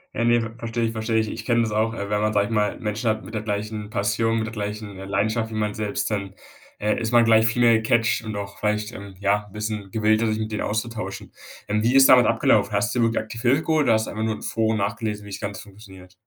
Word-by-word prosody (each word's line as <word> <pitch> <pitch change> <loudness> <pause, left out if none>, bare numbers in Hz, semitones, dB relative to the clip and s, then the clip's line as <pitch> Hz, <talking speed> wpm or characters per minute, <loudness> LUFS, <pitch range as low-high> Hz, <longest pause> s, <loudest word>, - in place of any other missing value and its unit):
Ja, 115 - 0
ne, 120 0 +4
ver 115 -1 -4
verstehe 115 0 -2
ich, 115 - -2
verstehe 110 0 -1
ich. 110 - 0
Ich - - -6
kenne 120 -1 +2
das 110 - -2
auch, 110 +2 +1
äh, 100 -2 -5
wenn 105 0 0
man, 110 0 +1
sage 105 -1 +2
ich 105 - -7
mal 105 -1 0
Menschen 110 +1 -2
hat 110 -2 -2
mit 105 - -10
der 110 - -2
gleichen 105 0 -4
Passion, 110 +2 0
mit 110 - -1
der 110 - -7
gleichen, 105 -1 -5
äh, 95 - -8
Leidenschaft 110 +3 0
wie 110 - -5
man 105 -1 -1
selbst, 105 0 -2
dann, 100 -2 -3 0.5
äh, 105 +1 0
ist 115 -1 -2
man 120 -1 +5
gleich 110 0 +5
viel 115 +2 +1
mehr 120 -1 +6
gecatcht 115 +1 +1
und 110 -1 -5
auch 100 -1 -6
vielleicht, 105 +2 -1
ähm, 100 -2 -9
ja, 100 +1 +1
'n - - -20
bisschen 105 -1 -5
gewillter, 110 +1 +2
sich 110 0 -1
mit 110 0 -4
denen - - -2
auszutauschen. 110 -2 -4 0.3
Ähm, 105 +1 0
wie 120 +3 +2
ist 135 0 +8
damals 125 -4 +7
abgelaufen? 110 -2 +3
Hast 120 +5 0
du 125 - +1
dir - - +3
wirklich 115 -1 0
aktiv 115 +1 -8
Hilfe 130 +6 +2
geholt 155 -2 +2
oder 115 - +5
hast 110 0 +1
du - - -5
einfach 110 +2 -3
nur 110 -1 0
in - - -11
Foren 110 -1 0
nachgelesen, 105 0 -3
wie 100 - -10
das - - -5
Ganze 100 -1 -5
funktioniert? 95 -3 -15
110 Hz, 275 wpm, -23 LUFS, 105-115 Hz, 0.5 s, ist